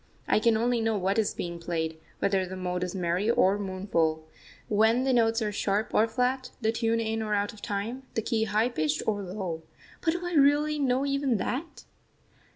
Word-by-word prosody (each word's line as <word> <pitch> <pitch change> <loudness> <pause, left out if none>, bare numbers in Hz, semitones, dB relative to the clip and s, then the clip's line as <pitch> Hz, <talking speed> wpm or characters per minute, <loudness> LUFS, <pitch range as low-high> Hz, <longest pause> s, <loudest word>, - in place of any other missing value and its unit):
I - - +4
can 225 0 +3
only 240 +1 +1
know 225 -1 +1
what 195 +3 +1
is 215 - 0
being 170 -1 -4
played, 160 -1 -3 0.2
whether 195 -1 +1
the 185 - -6
mode 180 -1 -2
is 180 +1 -4
merry 180 +3 0
or 200 -3 +3
mournful, 175 -5 -1 0.4
when 220 +4 +3
the 265 -1 +2
notes 225 -1 +3
are 210 - -1
sharp 205 +1 -1
or 220 - +4
flat, 250 +3 -1
the 220 -2 +1
tune 230 0 0
in 225 0 -1
or 215 -1 0
out 205 0 -1
of 210 - -14
time, 210 +6 -3
the 225 - 0
key 220 -1 0
high 215 +2 +1
pitched 155 -9 -1
or 205 -2 0
low. 180 -4 -4 0.4
But 325 - +2
do 350 +1 -4
I 350 - -3
really 295 +1 +4
know 265 0 +1
even 275 -4 +1
that? 275 - -4
220 Hz, 200 wpm, -28 LUFS, 190-245 Hz, 0.4 s, I